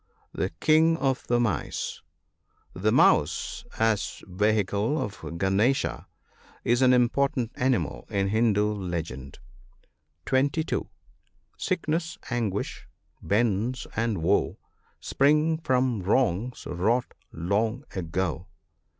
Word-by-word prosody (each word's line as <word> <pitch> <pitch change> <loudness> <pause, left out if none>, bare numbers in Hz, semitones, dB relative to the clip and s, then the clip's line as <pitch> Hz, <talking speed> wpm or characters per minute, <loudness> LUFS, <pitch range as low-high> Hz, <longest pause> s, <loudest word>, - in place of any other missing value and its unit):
The - - -1
king 160 +1 +4
of 135 -4 -1
the 120 0 +2
mice, 110 -6 -2 0.4
— - - -49 0.3
The - - 0
mouse, 80 - +2
as 110 -2 0
vehicle 105 - +1
of 105 - -4
Gunesh, 95 +9 +1 0.8
is 120 +2 +2
an 130 -1 +6
important 125 -1 +2
animal 130 -1 -1
in 100 -2 0
Hindu 110 -1 +2
legend. 80 -9 -5 0.9
(22.) 145 +4 0 0.7
Sickness, 165 -2 -2
anguish, 110 -5 -2 0.3
bonds, 115 +3 0
and 110 -6 -1
woe, 95 +5 +2 0.4
Spring 150 +3 +2
from 130 -7 +1
wrongs 115 +3 0
wrought 110 +8 0 0.2
long 110 - -1
ago. 90 -1 -2
115 Hz, 100 wpm, -26 LUFS, 95-130 Hz, 0.9 s, an